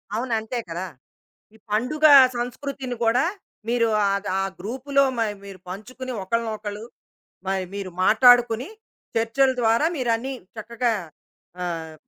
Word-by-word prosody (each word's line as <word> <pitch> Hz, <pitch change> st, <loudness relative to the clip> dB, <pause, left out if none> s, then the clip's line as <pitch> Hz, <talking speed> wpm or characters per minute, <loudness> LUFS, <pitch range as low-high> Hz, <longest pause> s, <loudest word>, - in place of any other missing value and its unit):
అవును. 240 Hz, +2 st, -2 dB
అంతే 220 Hz, +3 st, -4 dB
కదా! 175 Hz, +3 st, -4 dB, 0.7 s
ఈ -, -, -17 dB
పండుగ 270 Hz, +9 st, +1 dB, 0.3 s
సంస్కృతిని 255 Hz, +1 st, -4 dB
కూడా 235 Hz, +5 st, +3 dB, 0.4 s
మీరు 235 Hz, -1 st, +2 dB, 0.2 s
ఆహ్, 200 Hz, 0 st, +1 dB
గ్ -, -, -3 dB
ఆ -, -, +1 dB, 0.2 s
గ్రూపులో 265 Hz, +5 st, 0 dB
మ -, -, -1 dB, 0.3 s
మీరు 195 Hz, -1 st, -10 dB
పంచుకుని, 255 Hz, +7 st, -7 dB
ఒకళ్ళనొకళ్ళు 215 Hz, -1 st, -3 dB, 0.6 s
మరి 190 Hz, -1 st, -1 dB
మీరు 195 Hz, -2 st, -5 dB
మాటాడుకుని 245 Hz, +3 st, +5 dB, 0.5 s
చర్చల 230 Hz, +4 st, +3 dB
ద్వారా 230 Hz, +6 st, +3 dB
మీరన్నీ 250 Hz, 0 st, -1 dB, 0.2 s
చక్కగా 235 Hz, +2 st, -1 dB, 0.7 s
ఆహ్, 165 Hz, -2 st, -5 dB
230 Hz, 120 wpm, -24 LUFS, 205-255 Hz, 0.7 s, మాటాడుకుని